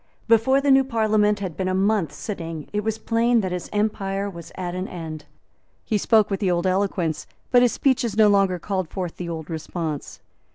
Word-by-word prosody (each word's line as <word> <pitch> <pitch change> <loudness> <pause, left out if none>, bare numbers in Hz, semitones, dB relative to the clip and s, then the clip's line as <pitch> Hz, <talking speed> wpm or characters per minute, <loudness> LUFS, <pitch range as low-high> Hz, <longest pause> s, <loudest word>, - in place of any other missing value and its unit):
Before 230 +4 +4
the 280 0 +3
new 270 0 +6
Parliament 215 -4 +1
had 180 -5 -4
been 190 - -2
a 185 - 0
month 195 -5 +1
sitting 165 -3 -6
it 210 0 -1
was 220 0 -1
plain 230 +1 +2
that 185 -2 -3
his 180 -1 -4
empire 200 -2 -1
was 170 -2 -10
at 180 -2 -4
an 185 +2 -3
end. 160 -3 -7 0.6
He 215 - 0
spoke 215 0 +3
with 195 - -1
the 195 - +1
old 175 0 0
eloquence; 185 -4 0 0.2
but 245 - +6
his 245 -1 +3
speeches 240 -6 +1
no 215 -1 +6
longer 195 -3 +3
called 185 -1 -3
forth 180 -2 -5
the 175 -1 -5
old 160 -2 -5
response. 160 -2 -5
195 Hz, 200 wpm, -23 LUFS, 175-220 Hz, 0.6 s, new